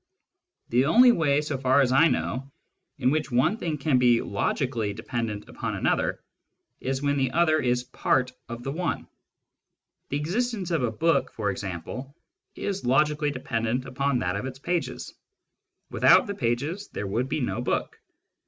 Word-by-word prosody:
The 125 +3 +3
only 240 - +7
way, 150 -8 +2
so 150 -3 -3
far 130 +1 +3
as 130 -2 +2
I 145 +6 +6
know, 135 -3 -2 0.5
in 130 -2 +2
which 155 0 0
one 140 - +2
thing 165 -7 -2
can 140 -2 +2
be 120 -2 +5
logically 110 +1 -1
dependent 110 -2 -4
upon - - -4
another - - 0 0.6
is 135 +1 -2
when 145 0 +1
the 130 -2 +1
other 155 +1 +3
is 125 0 +1
part 125 0 0 0.2
of 120 +1 -6
the 135 - -3
one. 170 +3 -2 1.0
The 140 - -1
existence 195 +4 -2
of 165 -4 +1
a 120 - +1
book, 165 +9 +1
for 105 -2 -1
example, 95 - -6 0.4
is 200 -1 -3
logically 150 +4 +2
dependent 125 -2 -2
upon 135 0 0
that 90 -5 -1
of 105 +6 -3
its 130 0 -7
pages: 170 +4 -3 0.8
without - - +5
the 200 - -3
pages 145 - -2
there 105 - -5
would 120 +7 -1
be - - -1
no 120 -2 -2
book. 125 - -2
135 Hz, 160 wpm, -26 LUFS, 120-155 Hz, 1.0 s, only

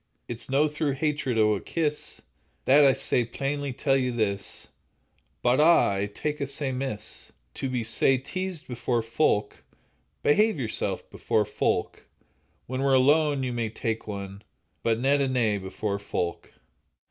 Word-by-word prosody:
It's 115 0 -6
no 140 +3 +3
through 150 -1 -1
hatred 140 -4 -1
o' 105 -1 +4
a 100 - -2
kiss, 150 -3 -2 0.4
That 145 +3 +6
I 140 - +7
sae 125 - +1
plainly 140 +4 -3
tell 135 +2 +1
you 130 -2 +1
this, 100 -4 -2 0.8
But, 125 +2 +3
ah! 165 -7 +6
I 100 +1 -1
tak' 150 +8 -4
it 140 - -2
sae 140 0 -2
amiss 130 -4 -4 0.2
To 135 - -3
be 125 -2 -1
sae 120 +4 +3
teased 180 +5 -5
before 120 -1 -1
folk. 115 -3 0 0.6
Behave 210 +6 +4
yoursel' 115 -4 -2
before - - 0
folk, - - -1 0.6
When 130 +1 -3
we're 135 -1 +4
alone, 145 +1 +4
ye 125 - -1
may 120 -2 -2
tak' 110 0 -3
one, 100 -1 -6 0.4
But 115 -1 +1
nent 140 +3 +3
a 130 -2 +1
ane 105 -4 +1
before 100 +2 -3
folk. 90 -4 -3
130 Hz, 155 wpm, -27 LUFS, 110-145 Hz, 0.8 s, I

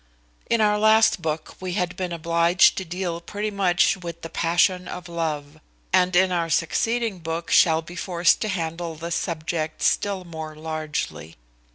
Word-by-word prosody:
In 230 -1 +2
our 210 -1 +3
last 220 -3 +4
book 155 -1 -4
we 185 -1 -4
have 180 -2 -1
been 185 -2 -4
obliged 170 +2 +3
to - - -4
deal 175 0 -4
pretty 205 +4 -4
much 190 -2 +2
with 170 -2 -8
the 165 - -7
passion 180 +2 +1
of 180 0 -7
love; 155 -3 -4 0.3
and 185 -1 +3
in 185 +1 +4
our 170 -2 0
succeeding 225 +5 0
book 165 +1 -4
shall 160 -1 +5
be 175 +2 -11
forced 175 -1 +2
to 215 - 0
handle 165 -3 -3
this 170 +2 -5
subject 160 -2 -3
still 200 -2 +1
more 160 -2 -7
largely. 155 - -5
170 Hz, 165 wpm, -24 LUFS, 165-185 Hz, 0.3 s, shall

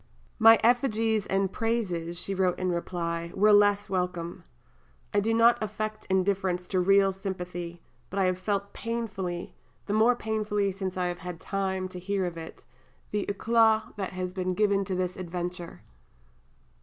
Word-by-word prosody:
"My 225 0 +8
effigies 225 -3 +2
and 195 0 +1
praises," 180 -7 -1
she 195 - -2
wrote 185 -2 +1
in 185 0 -1
reply, 170 -1 -3
"were 210 +2 +5
less 205 0 +4
welcome. 180 -3 -3 0.7
I 205 - +4
do 220 +3 0
not 230 +1 +5
affect 215 0 -4
indifference 190 -1 +1
to 185 - +1
real 195 +1 +4
sympathy, 180 -3 -6 0.3
but 195 - -6
I 195 - +3
have 185 0 0
felt 200 +1 -2
painfully, 200 -6 -4 0.3
the 205 - -2
more 225 +3 +4
painfully 210 -3 -1
since 190 -1 -4
I 180 - 0
have 175 0 -3
had 180 -2 -7
time 190 -1 -2
to 180 - -7
hear 195 +1 -1
of 175 -1 -4
it, 165 -1 -10 0.5
the 210 -1 -1
éclat 220 +1 +2
which 195 -3 -3
has 185 0 -4
been 185 -1 -2
given 200 -1 +2
to 190 - -2
this 180 0 -2
adventure. 175 -1 -5
195 Hz, 160 wpm, -28 LUFS, 180-210 Hz, 0.7 s, My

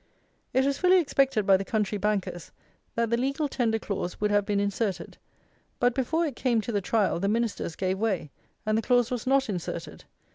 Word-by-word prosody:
It 260 +1 +2
was 280 0 0
fully 370 0 +5
expected 270 - +1
by 195 -1 +6
the 195 - -3
country 210 -1 -1
bankers, 190 -5 -2 0.4
that 230 -1 0
the 235 - +3
legal 275 +4 0
tender 235 -5 0
clause 195 -4 -4
would 210 0 +1
have 205 -1 +2
been 205 -1 +1
inserted; 200 0 -2 0.6
but, 245 0 +3
before 305 +7 0
it 285 -6 -4
came 240 -3 +1
to 235 - -4
the 205 -2 0
trial, 200 -2 +1
the 195 - 0
Ministers 220 -6 -1
gave 190 0 -1
way, 195 -9 -1 0.3
and 215 0 +1
the 220 - +2
clause 245 0 +2
was 245 -1 -3
not 270 0 +3
inserted. 180 -6 -5
220 Hz, 195 wpm, -27 LUFS, 200-255 Hz, 0.6 s, by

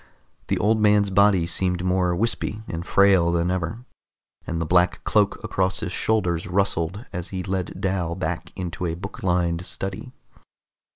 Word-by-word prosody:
The - - 0
old 110 +2 +2
man's 105 -1 +4
body 100 -3 +4
seemed 90 +1 0
more 90 -1 +1
wispy 110 +1 -1
and 85 +1 -4
frail 95 -3 +4
than 85 +1 +1
ever, 95 +7 -3 0.6
and 85 - -2
the 80 - -1
black 90 +2 +2
cloak - - +2
across 95 +2 0
his 100 -5 -3
shoulders 90 -5 0
rustled 95 +2 -1
as 90 0 -4
he 95 -1 -4
led 95 -1 -3
Dal 95 -4 -1
back 85 -1 -4
into 90 -1 -4
a 80 - -2
book 85 - -8
lined 90 -2 0
study. 95 +6 -5
90 Hz, 160 wpm, -24 LUFS, 85-100 Hz, 0.6 s, man's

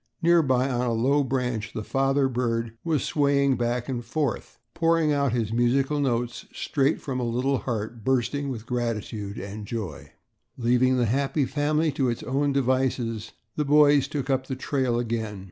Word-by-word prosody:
Nearby 140 -7 +4
on 125 -2 -1
a 120 - +1
low 135 +6 +2
branch 125 -4 -2
the 110 - -4
father 135 +3 +1
bird 115 -2 -2
was 160 -5 0
swaying 140 -2 +2
back 120 0 -1
and 125 -3 -3
forth, 135 +2 -3 0.2
pouring 165 -2 +2
out 140 -2 +1
his 115 -2 -1
musical 135 +5 +2
notes 120 -3 -1
straight 140 +1 0
from 130 -2 -4
a - - -1
little 125 +3 0
heart 115 -1 -4
bursting 135 +3 0
with 115 -4 -5
gratitude 110 -4 -3
and 100 +1 -7
joy. 105 -10 -6 0.4
Leaving 125 +2 +3
the 120 - +2
happy 135 +5 +1
family 150 +3 +1
to 135 -2 0
its 120 - -3
own 140 +2 0
devices, 130 -4 0 0.2
the 150 - 0
boys 145 -1 +5
took 145 -2 -3
up 130 0 0
the 130 - -3
trail 130 -2 0
again. 110 -3 -2
130 Hz, 165 wpm, -25 LUFS, 115-140 Hz, 0.4 s, boys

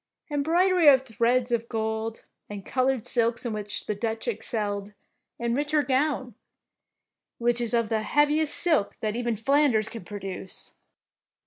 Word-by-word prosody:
Embroidery 335 +4 +3
of 265 -2 +7
threads 240 +1 +1
of 235 -1 -1
gold 220 0 -3 0.2
and 205 -2 -7
col 255 0 +1
oured 260 -4 0
silks 235 0 +1
in 235 - -2
which 210 -1 -4
the 210 - -1
Dutch 220 +3 -3
excelled, 205 -2 -3 0.4
enrich 260 +6 -1
her 300 -1 +4
gown, 265 -1 0 1.0
which 240 0 +1
is 235 0 0
of 230 -2 +1
the 220 -1 0
heav 295 +7 +3
iest 310 +1 +1
silk 310 - +2
that 215 -1 -1
even 240 -1 -1
Flanders 230 -2 +2
can 225 -4 -8
pro 205 +4 -7
duce. 190 -1 -6
235 Hz, 155 wpm, -26 LUFS, 220-270 Hz, 1.0 s, of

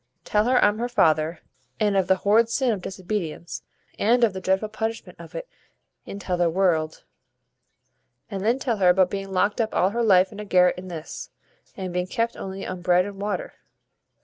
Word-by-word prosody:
Tell 210 0 +2
her 250 +1 +3
I'm 205 +1 +2
her 240 +1 -1
father; 160 -6 +2 0.4
and 210 -2 +2
of 190 -2 +2
the 190 - +4
horrid 215 +4 +3
sin 245 +1 +1
of 205 -4 -2
disobedience, 180 -3 -5 0.4
and 240 +3 +3
of 220 -4 +4
the 190 - -6
dreadful 190 +3 0
punishment 220 +1 -5
of - - -12
it - - -5 0.6
in - - -6
t'other 180 -3 0
world, 165 -3 0 1.2
and 195 -3 -5
then 230 +4 +2
tell 245 -4 -1
her 185 -2 +4
about 185 0 +4
being 195 -1 -4
locked 200 +4 +1
up 220 -1 -2
all 185 +2 +3
her 235 +2 -1
life 190 -4 +4
in 210 - -10
a - - -4
garret 180 -3 +3
in 185 - -9
this, 165 -3 -7 0.5
and 185 -2 -5
being 180 0 -1
kept 230 +2 -1
only 195 0 -6
on 185 -1 -5
bread 180 0 +3
and 200 -1 -8
water." 210 - -3
195 Hz, 195 wpm, -24 LUFS, 180-220 Hz, 1.2 s, the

